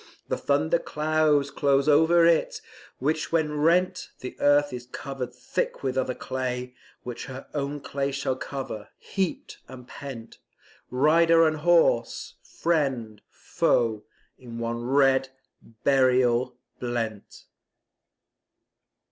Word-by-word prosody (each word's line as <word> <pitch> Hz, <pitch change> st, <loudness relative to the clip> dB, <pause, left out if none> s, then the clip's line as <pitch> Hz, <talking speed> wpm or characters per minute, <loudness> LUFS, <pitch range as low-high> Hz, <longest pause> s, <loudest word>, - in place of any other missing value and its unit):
The -, -, +1 dB
thunder -, -, +1 dB
clouds 155 Hz, -, +1 dB
close 140 Hz, 0 st, +2 dB
o'er 160 Hz, +3 st, +5 dB
it, 170 Hz, -1 st, +2 dB, 0.4 s
which 155 Hz, +4 st, -1 dB
when 155 Hz, -2 st, 0 dB
rent 175 Hz, +4 st, +2 dB
The 130 Hz, -, -7 dB
earth 145 Hz, -1 st, +3 dB
is 125 Hz, 0 st, -7 dB
covered 130 Hz, -1 st, -6 dB
thick -, -, -3 dB
with 130 Hz, -1 st, -1 dB
other 130 Hz, -1 st, -1 dB
clay, 125 Hz, -1 st, -4 dB, 0.3 s
Which 125 Hz, -1 st, -6 dB
her 130 Hz, 0 st, -8 dB
own 145 Hz, 0 st, -3 dB
clay 140 Hz, 0 st, -2 dB
shall 135 Hz, -1 st, -2 dB
cover, 130 Hz, -5 st, -6 dB
heaped 190 Hz, -3 st, -4 dB
and 125 Hz, -1 st, -11 dB
pent, 130 Hz, -5 st, -9 dB, 0.5 s
Rider 165 Hz, +5 st, +4 dB
and 155 Hz, 0 st, +1 dB
horse, 160 Hz, -7 st, +2 dB
friend, 135 Hz, -10 st, -1 dB
foe, 110 Hz, -3 st, 0 dB, 0.4 s
in 120 Hz, -3 st, -9 dB
one 115 Hz, 0 st, -3 dB
red 135 Hz, +1 st, +3 dB, 0.5 s
burial 125 Hz, -2 st, +3 dB, 0.2 s
blent. 115 Hz, -4 st, -4 dB
135 Hz, 115 wpm, -26 LUFS, 125-155 Hz, 0.5 s, o'er